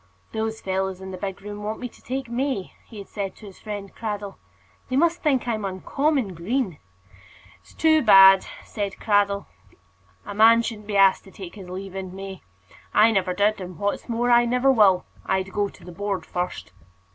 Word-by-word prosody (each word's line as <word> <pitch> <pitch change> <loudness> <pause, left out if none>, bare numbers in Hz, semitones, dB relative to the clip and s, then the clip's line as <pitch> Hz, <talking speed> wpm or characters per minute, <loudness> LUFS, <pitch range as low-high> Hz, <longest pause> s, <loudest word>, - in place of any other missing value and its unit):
"Those 220 0 -3
fellows 190 0 -2
in 190 0 -8
the - - -5
big 195 +1 -5
room 205 0 -7
want 215 +1 -4
me 250 - -4
to - - -19
take 260 +1 -4
May," 240 -4 -2
he 225 - -12
had 200 - -8
said 195 -2 -5
to - - -14
his 195 -2 -12
friend 205 -2 -7
Cradell. 205 -3 -5 0.5
"They 255 - -1
must 340 +4 +2
think 270 -5 +1
I'm 220 -3 -1
uncommon 230 +5 -1
green." 185 - -2 0.8
"It's 85 - -21
too 315 -1 +4
bad," 195 -4 +8 0.2
said 200 -2 -4
Cradell. 200 -1 +2 0.8
"A - - -6
man 225 +2 +6
shouldn't 215 -3 -6
be 205 -2 -1
asked 195 -1 +5
to 195 - -14
take 185 -3 -9
his 190 -4 -11
leave 190 +1 -7
in 190 -1 -6
May. 195 -1 -8 0.5
I 225 +2 +6
never 185 -3 0
did, 205 +1 +1
and 180 -1 -8
what's 205 +4 -2
more, 240 +1 +1
I 240 0 +6
never 250 +3 +3
will. 200 -7 +4 0.2
I'd 190 0 -1
go 205 -1 0
to - - -17
the 180 - -9
Board 200 +2 -3
first." 180 0 -4
205 Hz, 195 wpm, -24 LUFS, 190-230 Hz, 0.8 s, bad